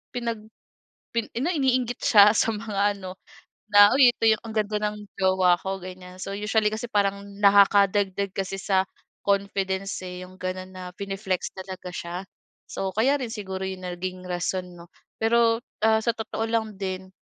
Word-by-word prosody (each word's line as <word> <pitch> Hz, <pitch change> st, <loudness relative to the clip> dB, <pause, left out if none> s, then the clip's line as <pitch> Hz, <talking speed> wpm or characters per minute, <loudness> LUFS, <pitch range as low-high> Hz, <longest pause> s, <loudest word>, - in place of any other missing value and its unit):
pinag 235 Hz, -2 st, -2 dB, 0.8 s
pi 230 Hz, -2 st, 0 dB
ano 265 Hz, +8 st, 0 dB
iniinggit 255 Hz, -6 st, +1 dB
siya 205 Hz, -1 st, +7 dB
sa 225 Hz, -, +2 dB
mga 205 Hz, -1 st, 0 dB
ano, 185 Hz, -1 st, -8 dB, 0.6 s
na, 205 Hz, 0 st, +8 dB
"Uy 255 Hz, -3 st, +8 dB
ito 225 Hz, -, -4 dB
'yong 220 Hz, -1 st, +3 dB
ang 225 Hz, -, -6 dB
ganda 210 Hz, 0 st, 0 dB
ng 210 Hz, -, -9 dB, 0.2 s
jowa 185 Hz, -1 st, +4 dB
ko." 195 Hz, 0 st, -3 dB
Ganyan. 180 Hz, 0 st, -10 dB
So 195 Hz, -, -5 dB
usually 210 Hz, +1 st, +1 dB
kasi 225 Hz, +3 st, -3 dB
parang 200 Hz, -1 st, +1 dB, 0.2 s
nakakadagdag 200 Hz, -1 st, +4 dB
kasi 195 Hz, 0 st, -2 dB
sa 190 Hz, -2 st, +2 dB, 0.4 s
confidence, 195 Hz, -1 st, -1 dB
eh, 180 Hz, 0 st, -7 dB
'yong 185 Hz, +1 st, -14 dB
gano'n 185 Hz, 0 st, -4 dB
na 180 Hz, -1 st, -7 dB
pine-flex 195 Hz, -2 st, -3 dB
talaga 185 Hz, -1 st, -7 dB
siya. 175 Hz, 0 st, -5 dB, 0.5 s
So, 195 Hz, -, -3 dB
kaya 265 Hz, +6 st, +3 dB
rin 235 Hz, -3 st, -4 dB
siguro 190 Hz, -3 st, -5 dB
'yong 190 Hz, -1 st, -5 dB
naging 185 Hz, 0 st, -5 dB
rason, 180 Hz, 0 st, -3 dB
'no? 170 Hz, 0 st, -13 dB, 0.3 s
Pero, 230 Hz, 0 st, +3 dB, 0.2 s
ah, 220 Hz, 0 st, +5 dB
sa 235 Hz, -, +2 dB
totoo 225 Hz, 0 st, -3 dB
lang 220 Hz, -2 st, -1 dB
din, 190 Hz, -1 st, -4 dB
200 Hz, 165 wpm, -25 LUFS, 185-220 Hz, 0.8 s, na